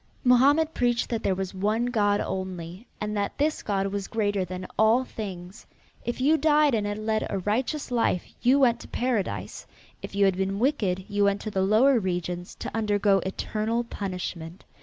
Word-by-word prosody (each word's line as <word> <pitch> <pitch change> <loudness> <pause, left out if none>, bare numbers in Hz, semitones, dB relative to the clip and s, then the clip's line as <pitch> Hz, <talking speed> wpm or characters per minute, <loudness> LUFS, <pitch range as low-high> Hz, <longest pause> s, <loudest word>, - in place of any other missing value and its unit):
Mohammed 285 +6 +4
preached 240 -1 +1
that 230 -2 -2
there 190 - +1
was 190 0 -4
one 210 +5 0
God 205 -4 +2
only, 185 +2 -5
and 210 0 -3
that 200 -1 -2
this 300 +2 0
God 195 -2 -1
was 195 0 -3
greater 205 -3 0
than 185 +1 -6
all 220 +4 +4
things. 190 -5 -8 0.4
If 240 +2 -3
you 295 +5 +4
died 300 -1 +4
and 210 -2 0
had 205 0 -3
led 215 0 -1
a 200 - -2
righteous 245 - -2
life 230 -7 +1 0.2
you 255 +3 +4
went 240 -4 +3
to - - -11
Paradise; 240 -6 -2 0.3
if - - -8
you 200 0 +4
had 190 -2 +2
been 195 +1 -1
wicked 205 -7 0
you 205 0 +1
went 200 0 +2
to 215 - -5
the 190 - 0
lower 230 +7 +4
regions 180 -2 -3
to - - -6
undergo 205 -2 +2
eternal 220 +4 -2
punishment. 180 -5 -6
210 Hz, 180 wpm, -26 LUFS, 190-240 Hz, 0.4 s, Mohammed